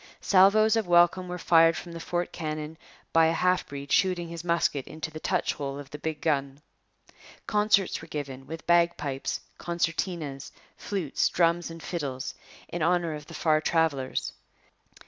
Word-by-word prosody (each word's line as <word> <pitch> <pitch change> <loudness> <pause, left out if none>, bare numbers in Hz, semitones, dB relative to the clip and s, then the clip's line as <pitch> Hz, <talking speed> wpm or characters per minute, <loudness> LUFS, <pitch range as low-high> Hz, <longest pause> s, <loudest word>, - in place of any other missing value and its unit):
Salvoes 205 +3 +5
of 220 -4 0
welcome 175 +1 +4
were 180 0 -4
fired 165 -1 +5
from 175 - -7
the 170 - -7
fort 175 +1 -2
cannon 155 -1 -5 0.4
by 165 0 +6
a 165 - +2
half 180 +2 +1
breed 140 0 -8
shooting 180 -3 +2
his 170 0 -7
musket 170 -5 0
into 155 0 -6
the 155 - -7
touch - - 0
hole 140 -1 -5
of 145 -1 -10
the 150 - -7
big 155 0 -4
gun. 140 -3 0 0.9
Concerts 210 -2 +2
were 165 - -11
given, 135 -4 -6
with 160 0 -8
bagpipes, 170 -6 +1 0.2
concertinas, 165 -4 -3 0.2
flutes, 185 -9 -1
drums, 170 0 +1
and 165 0 -10
fiddles, 135 -7 -4 0.3
in 175 - -5
honour 170 0 +1
of 150 -1 -8
the - - -10
far 155 -1 +2
travellers. 155 -6 0
165 Hz, 160 wpm, -27 LUFS, 150-175 Hz, 0.9 s, by